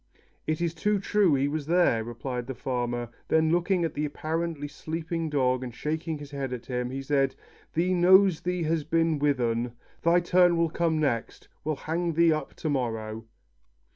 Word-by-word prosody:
"It 155 +1 -1
is 170 -1 0
too 205 +5 +1
true, 195 -4 +3
he 135 +1 +1
was 150 0 -3
there," 170 -10 +3
replied 120 +1 -5
the 135 - -5
farmer; 120 -2 -2 0.2
then 160 0 +3
looking 175 +1 +2
at 160 - -3
the 150 - -2
apparently 155 0 -3
sleeping 160 +2 -4
dog, 130 -3 +1
and 120 -2 -7
shaking 155 +3 -3
his 145 -1 -10
head 135 -2 -4
at 125 -1 -6
him, 125 -1 -2
he 135 +1 -5
said, 135 -1 +1 0.4
"Thee 175 +3 +2
knows 185 0 +5
thee 180 -1 -1
has 160 0 0
been 165 0 +1
with 145 -2 +2
un. 120 0 0 0.3
Thy 170 +1 +4
turn 175 0 +4
will 165 -1 +1
come 165 -1 +1
next. 130 -7 -2
We'll 155 0 -1
hang 165 +4 -2
thee 165 0 +4
up 155 -3 -4
to 155 - -3
morrow." 110 -4 -3
155 Hz, 185 wpm, -27 LUFS, 130-170 Hz, 0.4 s, knows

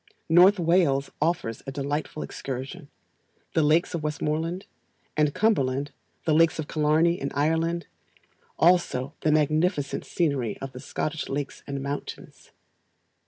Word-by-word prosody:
North 180 +5 +7
Wales 165 -6 +2
offers 150 -8 -1
a - - -3
delightful 145 +2 -3
excursion; 135 +5 -6 0.6
the 160 - +3
lakes 155 +4 +3
of 170 - -2
Westmoreland 155 +4 -2 0.5
and 150 -1 +3
Cumberland; 140 -10 +1 0.3
the 160 - +2
lakes 165 +1 +4
of 155 -2 -4
Killarney, 160 +3 +2
in 140 - -2
Ireland; 165 +4 +1 0.7
also 160 -6 +2
the 155 - +2
magnificent 155 0 +1
scenery 140 -10 -1
of 135 0 -7
the 125 - -9
Scottish 155 +4 -4
lakes 140 0 -4
and 140 -1 -4
mountains. 140 +1 -7
150 Hz, 125 wpm, -26 LUFS, 140-165 Hz, 0.7 s, North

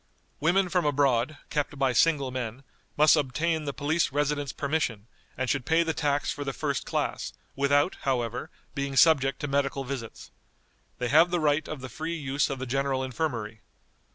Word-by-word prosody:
Women 180 +5 +3
from 180 0 +1
abroad, 140 -1 +2
kept 145 -1 -1
by 135 -2 +2
single 140 -3 +3
men, 125 0 -5 0.3
must 150 +2 +7
obtain 155 +3 0
the 140 - -1
police 155 +4 0
residence 145 -1 0
permission, 140 -8 -2 0.3
and 130 - -1
should 140 0 0
pay 165 +5 +3
the 165 -1 -1
tax 145 -2 0
for 145 - -4
the 135 -1 -3
first - - -2
class, - - -2 0.2
without, 140 +5 +2
however, 125 +1 -1 0.2
being 140 -1 -3
subject 135 -3 +4
to 145 - -2
medical 140 0 0
visits. 125 -4 -7 0.7
They 125 -1 -2
have 160 +6 +6
the 175 0 0
right 150 0 +1
of 155 -4 -6
the 130 - -6
free 160 +7 -4
use 140 -2 0
of 135 - -3
the 130 - -4
General 135 +1 0
Infirmary. 120 -5 -3
140 Hz, 175 wpm, -27 LUFS, 130-155 Hz, 0.7 s, must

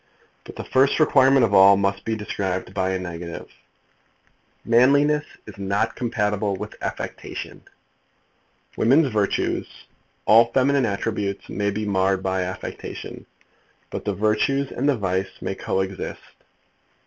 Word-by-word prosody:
But - - -11
the - - -6
first 135 +3 +2
requirement 135 -4 +5
of 100 - -3
all 100 0 +7
must 100 0 -1
be 110 - -1
described 95 -3 -3
by 95 -1 0
a 95 - 0
negative. 85 -2 -7 1.2
Manliness 140 +5 +4 0.2
is 100 -2 -12
not 100 +1 -1
compatible 105 -4 -1
with - - -7
affectation. - - -6 1.1
Women's 135 +2 +3
virtues, 105 -2 0 0.6
all 115 +2 +6
feminine 135 -1 +3
attributes, 100 -1 -3
may 100 0 -1
be 105 +1 -3
marred 95 -1 +1
by 95 0 0
affectation, 90 +1 -7 0.6
but - - -5
the 100 - -2
virtues 110 +7 +1
and 140 +4 0
the 140 - +2
vice 95 -1 -2
may - - -3
co 95 - -2
exist. 95 0 -6
105 Hz, 130 wpm, -23 LUFS, 95-125 Hz, 1.2 s, all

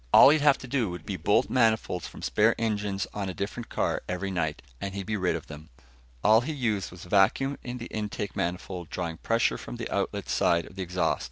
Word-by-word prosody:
All - - +10
he'd 150 +1 +4
have 145 -2 +5
to 130 - -9
do 120 -5 0
would 90 -2 -7
be 100 - -3
bolt 90 +4 +2
manifolds 110 -8 +1
from - - -11
spare 110 +2 +3
engines 105 -3 -1
on 100 -2 -3
a 95 - -5
different 110 +4 -4
car - - 0
every 95 +2 -2
night, 80 -5 -2 0.2
and 100 -1 -4
he'd 100 -1 -4
be 110 - -1
rid 95 -3 +1
of - - -7
it. 75 0 -8 0.6
All 110 +2 +6
he 155 +6 -3
used 110 -8 -1
was 90 -1 -11
vacuum 105 +9 +2
in 125 0 -5
the 120 - -6
intake 105 -2 -4
manifold, 90 0 -3
drawing 85 -3 -3
pressure 115 +6 +1
from - - -7
the 115 -1 -4
outlet 100 0 -1
side 85 0 +2
of - - -14
the 95 - -5
exhaust. 90 0 0
100 Hz, 225 wpm, -28 LUFS, 90-115 Hz, 0.6 s, All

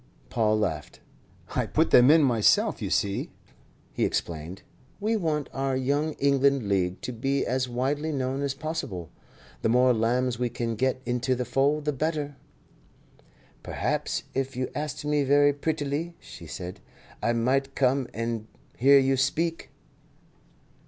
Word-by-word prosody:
Paul 110 -2 +2
laughed. 80 -8 -3 0.6
"I - - 0
put - - +1
them 125 +2 +7
in 155 0 +6
myself. 115 -6 +3
You - - -2
see," 100 -1 0 0.6
he - - -1
explained, 85 +3 -3 0.4
"we 215 +2 0
want 155 -7 -1
our 135 0 -1
Young 145 +4 0
England 140 -4 +2
League 95 -2 0
to 125 - -4
be 135 +4 0
as 130 0 -1
widely 140 +6 -1
known 135 -1 -2
as 140 -1 -1
possible. 135 - -5 0.5
The - - +1
more 125 +2 +5
lambs 120 +2 0
we 125 -1 0
can 115 -1 -3
get 130 +3 0
into 125 +1 0
the 125 0 -2
fold, 140 +5 +1
the 150 - +1
better." 150 0 -2 1.3
"Perhaps - - -2
if 135 0 -2
you 130 0 -2
asked 150 -1 -4
me 150 0 +2
very 145 +1 +4
prettily," 150 +2 -2
she 85 - -11
said, 90 +3 -7 0.4
"I 120 - +1
might 135 +4 0
come 130 -1 +2
and 115 -1 -3 0.3
hear 140 +3 +6
you 135 0 +3
speak." 165 +5 0
130 Hz, 145 wpm, -27 LUFS, 120-145 Hz, 1.3 s, them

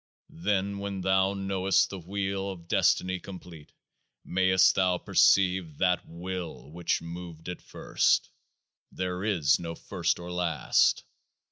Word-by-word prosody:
Then, 100 +2 0
when 100 -1 -4
thou 95 +1 +2
know'st 95 -1 +1
the 95 - -6
Wheel 95 +2 -3
of 85 -3 -9
Destiny 95 +1 +2
complete, 90 -5 -11 0.5
mayst 95 0 +4
thou 90 -2 +2
perceive 90 -5 +3
THAT 90 -1 +1
Will 85 -4 -6
which 85 0 -1
moved 85 -1 -8
it 90 - -6
first. - - 0 0.6
[There 90 0 -3
is 85 -10 +2
no 85 -1 -5
first - - -1
or 85 0 -8
last. 90 -2 +2
95 Hz, 125 wpm, -28 LUFS, 85-95 Hz, 0.6 s, mayst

